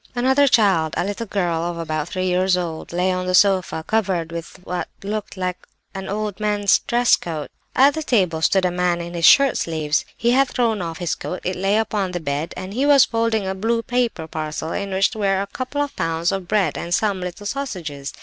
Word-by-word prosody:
Another 265 Hz, +3 st, +3 dB
child, 195 Hz, -, +3 dB
a -, -, +1 dB
little 205 Hz, +3 st, -4 dB
girl 175 Hz, -5 st, -1 dB
of 170 Hz, 0 st, -3 dB
about 155 Hz, -1 st, -3 dB
three 185 Hz, 0 st, -2 dB
years 185 Hz, 0 st, +2 dB
old, 165 Hz, -3 st, -4 dB
lay 180 Hz, +2 st, +1 dB
on 185 Hz, 0 st, -2 dB
the 185 Hz, -, +2 dB
sofa, 185 Hz, -4 st, +3 dB
covered 190 Hz, -7 st, 0 dB
over -, -, -7 dB
with 165 Hz, -1 st, -7 dB
what 180 Hz, 0 st, -3 dB, 0.2 s
looked 210 Hz, 0 st, -4 dB
like 180 Hz, -1 st, -2 dB, 0.3 s
a 195 Hz, -, -5 dB
man's 190 Hz, -, -7 dB
old 210 Hz, -1 st, 0 dB
dress 240 Hz, 0 st, +4 dB
coat. 155 Hz, -4 st, -6 dB, 0.2 s
"At 275 Hz, +2 st, +6 dB
the 315 Hz, -, -3 dB
table 185 Hz, -, +1 dB
stood 190 Hz, +3 st, +3 dB
a 180 Hz, -, +1 dB
man 180 Hz, -1 st, 0 dB
in 170 Hz, 0 st, -6 dB
his 170 Hz, -2 st, +1 dB
shirt 275 Hz, -, +6 dB
sleeves; 155 Hz, -2 st, 0 dB
he 235 Hz, -, +2 dB
had 270 Hz, +2 st, +4 dB
thrown 230 Hz, -5 st, 0 dB
off 165 Hz, -2 st, -4 dB
his 175 Hz, -2 st, -1 dB
coat; 180 Hz, -, -5 dB
it 185 Hz, -, -2 dB
lay 195 Hz, +3 st, +1 dB
upon 205 Hz, -4 st, -1 dB
the 175 Hz, -, -2 dB
bed; 150 Hz, 0 st, -3 dB
and 185 Hz, +1 st, -6 dB
he 255 Hz, +5 st, 0 dB
was 285 Hz, -2 st, +6 dB
unfolding 225 Hz, -2 st, 0 dB
a 190 Hz, -, -1 dB
blue 230 Hz, +4 st, -1 dB
paper 245 Hz, -10 st, -1 dB
parcel 155 Hz, 0 st, -4 dB
in 200 Hz, -1 st, -3 dB
which 195 Hz, +3 st, +1 dB
were 195 Hz, -3 st, +1 dB
a 200 Hz, -, -1 dB
couple 255 Hz, +7 st, -4 dB
of 285 Hz, -, -7 dB
pounds 165 Hz, +1 st, 0 dB
of 195 Hz, -2 st, -4 dB
bread, 195 Hz, -7 st, +1 dB
and 175 Hz, +1 st, -1 dB
some 205 Hz, -3 st, 0 dB
little 180 Hz, +3 st, -6 dB
sausages. 180 Hz, -, -4 dB
190 Hz, 220 wpm, -21 LUFS, 170-220 Hz, 0.3 s, At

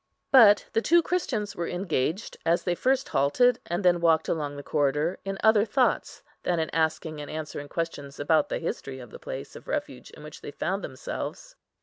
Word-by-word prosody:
But 215 Hz, -6 st, +7 dB
the 225 Hz, -, +2 dB
two 340 Hz, +6 st, +4 dB
Christians 240 Hz, -, -2 dB
were 170 Hz, -, -3 dB
engaged, 175 Hz, -, -2 dB
as 170 Hz, +1 st, +2 dB
they 175 Hz, -, +1 dB
first 265 Hz, +8 st, +1 dB
halted, 235 Hz, -, +3 dB
and 175 Hz, +3 st, -2 dB
then 175 Hz, -1 st, +4 dB
walked 160 Hz, -2 st, +3 dB
along 145 Hz, -3 st, -2 dB
the 145 Hz, -, -7 dB
corridor, 150 Hz, +5 st, 0 dB
in 195 Hz, 0 st, -4 dB
other 220 Hz, -1 st, +6 dB
thoughts, 250 Hz, +3 st, 0 dB, 0.2 s
than 175 Hz, -2 st, 0 dB
in 160 Hz, -, -2 dB
asking 160 Hz, -1 st, -1 dB
and 145 Hz, -, -8 dB
answering 150 Hz, -2 st, -6 dB
questions 145 Hz, -4 st, -4 dB
about 150 Hz, +1 st, +2 dB
the -, -, -1 dB
history 135 Hz, -5 st, -4 dB
of 125 Hz, -3 st, -11 dB
the -, -, -10 dB
place -, -, -7 dB
of -, -, -12 dB
refuge -, -, -4 dB
in 150 Hz, -, -13 dB
which 150 Hz, -1 st, -10 dB
they -, -, -7 dB
found 190 Hz, +6 st, -3 dB
themselves. 130 Hz, -2 st, -6 dB
165 Hz, 195 wpm, -27 LUFS, 150-205 Hz, 0.2 s, But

